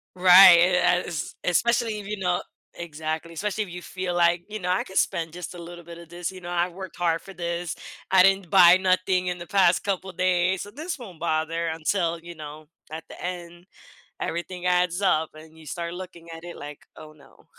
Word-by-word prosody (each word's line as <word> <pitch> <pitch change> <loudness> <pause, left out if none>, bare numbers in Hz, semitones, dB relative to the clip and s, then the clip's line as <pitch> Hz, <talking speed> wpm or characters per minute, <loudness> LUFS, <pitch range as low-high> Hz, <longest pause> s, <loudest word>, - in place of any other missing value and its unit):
Right, 180 0 +9 0.5
yes, 160 -4 -5
especially 225 +4 +1
if 200 - -9
you 210 0 -4
know 180 -2 0 0.4
Exactly, 160 0 -5
especially 210 +5 -2
if 190 - -11
you 180 +1 -7
feel 185 +2 -4
like, 175 0 +2
you 215 0 -5
know, 180 - -4
“I 185 - +1
could 190 - -7
spend 165 -4 0
just 180 +1 -7
a - - -9
little 175 0 -10
bit 170 0 -11
of 170 -1 -13
this, 175 +1 -5
you 185 - -11
know, 175 - -8
I 175 0 +1
worked 190 +1 -9
hard 165 -2 0
for 195 - -11
this. 170 -1 -3 0.4
I 190 -1 +7
didn't 195 -2 +3
buy 180 -2 +8
nothing 185 0 +1
in 180 0 -3
the 170 - -9
past 185 -3 +3
couple 190 -1 -2
days, 185 0 +1
so 205 - -7
this 305 - -6
won't 190 -9 -11
bother" 165 0 -1
until, 165 +1 -1
you 170 0 -11
know, 155 0 -10 0.2
at 160 +1 -6
the - - -11
end, 175 -1 -7 0.6
everything 175 +1 -4
adds 180 +1 +1
up, 160 -5 +2
and 155 +1 -15
you 160 - -15
start 170 +1 -5
looking 175 -2 -10
at 165 +1 -10
it 175 - -8
like, 145 0 -9 0.2
“Oh, 155 0 -12
no.” 150 -2 -21
175 Hz, 210 wpm, -25 LUFS, 170-185 Hz, 0.6 s, Right